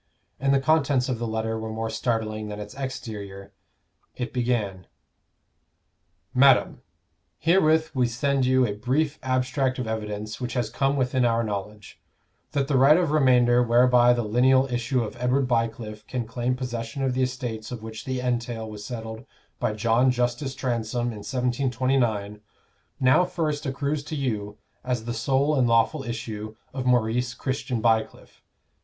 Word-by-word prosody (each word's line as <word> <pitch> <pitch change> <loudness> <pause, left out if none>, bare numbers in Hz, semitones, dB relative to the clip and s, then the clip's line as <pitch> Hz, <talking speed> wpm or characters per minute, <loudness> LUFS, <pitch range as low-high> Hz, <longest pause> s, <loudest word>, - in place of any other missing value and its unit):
And 135 +1 +2
the 140 - +4
contents 140 -3 +2
of 125 -3 -2
the 120 - -2
letter 110 0 -2
were 110 0 -5
more 110 0 -3
startling 110 -2 -2
than 105 0 -6
its 105 0 -7
exterior. 105 -8 -7 0.6
It 125 0 -4
began: 115 -8 -1 1.5
MADAM, 135 0 +4 0.6
Herewith 160 -2 +3
we 125 -3 +2
send 135 +3 0
you 130 0 +4
a 105 - -2
brief 135 +8 -1
abstract 130 0 0
of 125 - -3
evidence 105 0 -4
which 120 -1 -3
has 120 -3 -1
come 135 +1 +1
within 130 -1 +1
our 115 -1 +2
knowledge, 105 -1 -6 0.5
that 140 -2 0
the 140 -3 +2
right 140 +4 +7
of 175 -4 +1
remainder 125 -4 +4
whereby 120 0 +5
the 120 -1 +1
lineal 130 +5 +4
issue 120 +1 0
of 110 - -6
Edward 125 +2 +1
Bycliffe 115 -3 -2
can 125 -2 -3
claim 120 +2 -1
possession 120 0 -4
of 130 -1 +1
the 130 - 0
estates 125 -3 -3
of 120 -3 -6
which 110 0 -7
the 130 -1 -2
entail 120 -2 -2
was 105 -1 -8
settled 110 -1 -6 0.4
by 110 - 0
John 115 +4 +2
Justus 125 +2 -1
Transome 120 -2 -2
in 110 - -8
1729, 125 -4 0 0.6
now 130 +7 +5
first 155 -5 -2
accrues 140 +2 -2
to 155 - -5
you 105 -7 -3 0.3
as 125 -3 -2
the 120 - -3
sole 135 +6 +1
and 125 - +3
lawful 115 +6 +2
issue 110 -3 -5 0.2
of 130 -1 -3
Maurice 125 +1 +1
Christian 130 -3 -3
Bycliffe. 110 -1 -1
125 Hz, 155 wpm, -25 LUFS, 110-130 Hz, 1.5 s, right